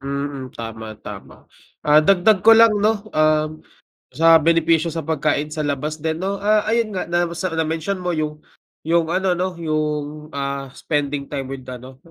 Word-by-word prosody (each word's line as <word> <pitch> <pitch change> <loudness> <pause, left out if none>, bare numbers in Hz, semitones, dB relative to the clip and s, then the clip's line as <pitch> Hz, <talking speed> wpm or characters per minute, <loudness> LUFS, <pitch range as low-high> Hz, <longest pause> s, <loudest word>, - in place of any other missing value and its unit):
Mm, 140 -1 -4
tama, 110 -1 -7
tama. 105 -2 -10 0.4
Ah, 150 +1 +6
dagdag 195 +4 +4
ko 225 +4 +7
lang, 230 -1 +7
'no, 210 0 +1
um, 155 0 +1 0.5
sa 165 +4 +6
benepisyo 165 0 +2
sa 165 - -3
pagkain 150 -1 -1
sa 155 -1 -3
labas 145 +2 -2
din, 160 +1 -2
'no, 195 +1 -2
ah, 210 +1 +3
ayun 225 -2 0
nga, 185 - -2
na 175 0 +2
sa 170 +2 -3
na-mention 160 +4 -1
mo 180 -1 -2
yung 155 -1 -3 0.5
yung 165 0 +2
ano, 185 +1 +1
'no, 180 0 -3
yung, 150 -2 -3
ah, 140 -1 -4
spending 145 0 -2
time 135 -2 -5
with 135 -1 -7
ano, 130 +1 -9
155 Hz, 170 wpm, -21 LUFS, 145-175 Hz, 0.5 s, ko